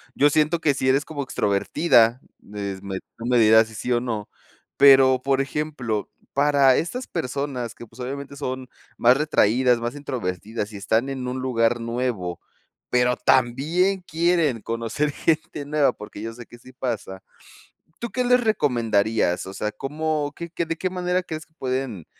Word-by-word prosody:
yo 145 Hz, +1 st, +5 dB
siento 155 Hz, +3 st, +2 dB
que 150 Hz, -4 st, +2 dB
sí 130 Hz, 0 st, 0 dB
eres 135 Hz, +3 st, +2 dB
como 145 Hz, -3 st, -5 dB
extrovertida, 120 Hz, +3 st, +2 dB, 0.4 s
es 100 Hz, -2 st, -4 dB
me 95 Hz, -1 st, -5 dB, 0.2 s
tú 115 Hz, -, -6 dB
me 125 Hz, -1 st, +3 dB
dirás 110 Hz, 0 st, +6 dB
sí, 110 Hz, -, -13 dB
sí 125 Hz, +5 st, -4 dB
o 120 Hz, -, +2 dB
no, 110 Hz, -4 st, -3 dB, 0.5 s
pero 135 Hz, -2 st, +7 dB
por 135 Hz, 0 st, +2 dB
ejemplo, 135 Hz, -7 st, -3 dB, 0.2 s
para 140 Hz, -2 st, +4 dB
estas 245 Hz, +10 st, -3 dB
personas 130 Hz, -6 st, -3 dB
que 120 Hz, -, -10 dB
pues 115 Hz, +3 st, -19 dB
obviamente 140 Hz, +2 st, -6 dB
son 130 Hz, -2 st, -4 dB, 0.3 s
más 125 Hz, +2 st, +5 dB
retraídas, 125 Hz, -4 st, +3 dB
más 120 Hz, +2 st, -3 dB
introvertidas 105 Hz, -, -4 dB
y -, -, -6 dB
están 110 Hz, +6 st, 0 dB
en 130 Hz, -2 st, -4 dB
un 125 Hz, +1 st, -3 dB
lugar 120 Hz, -2 st, +1 dB
nuevo, 115 Hz, -7 st, -3 dB, 0.5 s
pero 125 Hz, 0 st, +2 dB
también 160 Hz, +10 st, +2 dB
quieren 165 Hz, -7 st, +1 dB
conocer 115 Hz, +6 st, -2 dB
gente 155 Hz, -1 st, -1 dB
nueva 145 Hz, 0 st, +2 dB
porque 105 Hz, 0 st, -10 dB
yo 115 Hz, 0 st, -5 dB
sé 120 Hz, 0 st, -11 dB
que 120 Hz, -, -14 dB
sí 130 Hz, +2 st, -16 dB
pasa, 110 Hz, -7 st, -4 dB, 0.8 s
¿tú 235 Hz, -2 st, -5 dB
qué 250 Hz, +5 st, -1 dB
les 250 Hz, 0 st, +4 dB
recomendarías?, 115 Hz, -, +1 dB
o 95 Hz, -, -7 dB
sea, 105 Hz, 0 st, -3 dB
¿cómo 150 Hz, 0 st, -2 dB
qué 170 Hz, 0 st, -6 dB
qué 170 Hz, -, -2 dB
¿de 165 Hz, 0 st, -3 dB
qué 185 Hz, +3 st, -2 dB
manera 180 Hz, 0 st, -1 dB
crees 160 Hz, -2 st, -6 dB
que 160 Hz, -, -38 dB
pueden 130 Hz, -, -3 dB
130 Hz, 170 wpm, -23 LUFS, 115-150 Hz, 0.8 s, pero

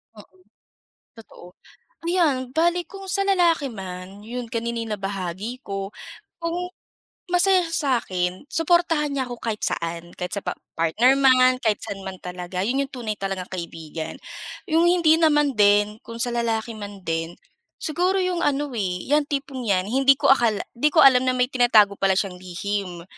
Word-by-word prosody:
Oo. 205 Hz, -2 st, -16 dB, 0.8 s
Totoo. 205 Hz, -5 st, -14 dB, 0.6 s
Ayan 300 Hz, -8 st, +1 dB
bale 345 Hz, +2 st, +2 dB
kung 390 Hz, -1 st, -9 dB
sa 390 Hz, +1 st, -1 dB
lalaki 340 Hz, -7 st, +3 dB
man, 190 Hz, -1 st, -8 dB
'yon 240 Hz, 0 st, -5 dB
kanina 235 Hz, 0 st, -2 dB
yung 225 Hz, -1 st, -3 dB
nabahagi 195 Hz, +5 st, -5 dB
ko. 195 Hz, -2 st, -5 dB, 0.5 s
Kung 350 Hz, +2 st, -3 dB, 0.6 s
masaya 365 Hz, 0 st, +3 dB
sya 280 Hz, -7 st, +1 dB
sa'kin, 180 Hz, +2 st, -3 dB
suportahan 330 Hz, -2 st, +2 dB
niya 270 Hz, -2 st, -1 dB
ako 245 Hz, -, -5 dB
kahit 220 Hz, -2 st, -3 dB
saan, 170 Hz, +1 st, -4 dB
kahit 180 Hz, 0 st, -5 dB
sa 200 Hz, -, -2 dB
pa -, -, -1 dB, 0.2 s
partner 225 Hz, +12 st, +3 dB
man, 255 Hz, -1 st, +5 dB
kahit 215 Hz, -4 st, +1 dB
saan 195 Hz, -1 st, -6 dB
man 190 Hz, -1 st, -6 dB
talaga, 180 Hz, 0 st, -5 dB
'yon 255 Hz, +5 st, 0 dB
'yong 275 Hz, 0 st, -4 dB
tunay 225 Hz, -5 st, -4 dB
talagang 195 Hz, -2 st, -4 dB
kaibigan. 165 Hz, -3 st, -6 dB, 0.5 s
'Yong 325 Hz, +2 st, +4 dB
hindi 335 Hz, -3 st, +4 dB
naman 295 Hz, -3 st, +3 dB
din, 210 Hz, +1 st, +4 dB
kung 230 Hz, -, -8 dB
sa 245 Hz, -, -2 dB
lalaki 230 Hz, -1 st, -1 dB
man 205 Hz, -2 st, -8 dB
din, 165 Hz, 0 st, -3 dB, 0.5 s
siguro 355 Hz, +5 st, 0 dB
'yong 365 Hz, -1 st, -1 dB
ano 290 Hz, 0 st, 0 dB
eh 185 Hz, -5 st, -2 dB
'yang 295 Hz, 0 st, +3 dB
tipong 275 Hz, -3 st, -4 dB
'yan, 185 Hz, -2 st, +2 dB
hindi 270 Hz, +2 st, +5 dB
ko -, -, +4 dB
akala, 230 Hz, -5 st, +1 dB, 0.2 s
hindi 295 Hz, +5 st, +3 dB
ko 315 Hz, +1 st, +4 dB
alam 260 Hz, -2 st, +6 dB
na 255 Hz, -, +2 dB
may 250 Hz, -, +2 dB
tinatago 220 Hz, -6 st, +4 dB
pala 195 Hz, -1 st, +3 dB
siyang 190 Hz, -2 st, -2 dB
lihim. 185 Hz, 0 st, -4 dB
235 Hz, 165 wpm, -23 LUFS, 195-290 Hz, 0.8 s, alam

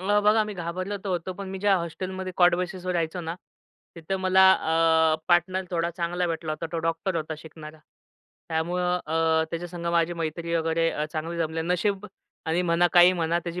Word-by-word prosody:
मग 205 Hz, +2 st, +2 dB
बघा, 215 Hz, +1 st, +5 dB
मी 210 Hz, -1 st, -6 dB
घाबरलं 185 Hz, +3 st, -4 dB
तर -, -, -3 dB
होतो, 180 Hz, 0 st, -2 dB
पण 195 Hz, -1 st, -6 dB
मी 190 Hz, -, -5 dB
ज्या 200 Hz, 0 st, +3 dB
हॉस्टेलमध्ये 185 Hz, +2 st, -5 dB
कॉट 175 Hz, -1 st, +5 dB
बेसिसवर 180 Hz, 0 st, -3 dB
रहायचो 170 Hz, 0 st, -2 dB
ना, 165 Hz, 0 st, -4 dB, 0.6 s
तिथं 170 Hz, +3 st, -4 dB
मला 190 Hz, 0 st, +5 dB
अ, 160 Hz, -2 st, +3 dB
पार्टनर 185 Hz, +2 st, +2 dB
थोडा 170 Hz, -1 st, 0 dB
चांगला 175 Hz, +1 st, -1 dB
भेटला 165 Hz, -2 st, -3 dB
होता. 155 Hz, +2 st, -4 dB
तो 165 Hz, -, -1 dB
डॉक्टर 165 Hz, +3 st, -1 dB
होता 160 Hz, 0 st, -3 dB
शिकणारा. 155 Hz, -1 st, -11 dB, 0.7 s
त्यामुळं 180 Hz, +2 st, 0 dB
अ, 160 Hz, 0 st, +2 dB
त्याच्या 175 Hz, +1 st, -4 dB
संग 170 Hz, -1 st, -7 dB
माझी 170 Hz, 0 st, +2 dB
मैत्री 170 Hz, 0 st, -3 dB
वगैरे 165 Hz, 0 st, +1 dB
अ, 150 Hz, -, -2 dB
चांगली 165 Hz, +2 st, -4 dB
जमली. 160 Hz, 0 st, -1 dB
नशीब. 190 Hz, +4 st, -1 dB, 0.4 s
आणि 165 Hz, +3 st, +1 dB
म्हणा 175 Hz, 0 st, +3 dB
काही 175 Hz, +1 st, +7 dB
म्हणा 170 Hz, -1 st, 0 dB
त्याची 175 Hz, +1 st, -5 dB
170 Hz, 185 wpm, -26 LUFS, 165-185 Hz, 0.7 s, काही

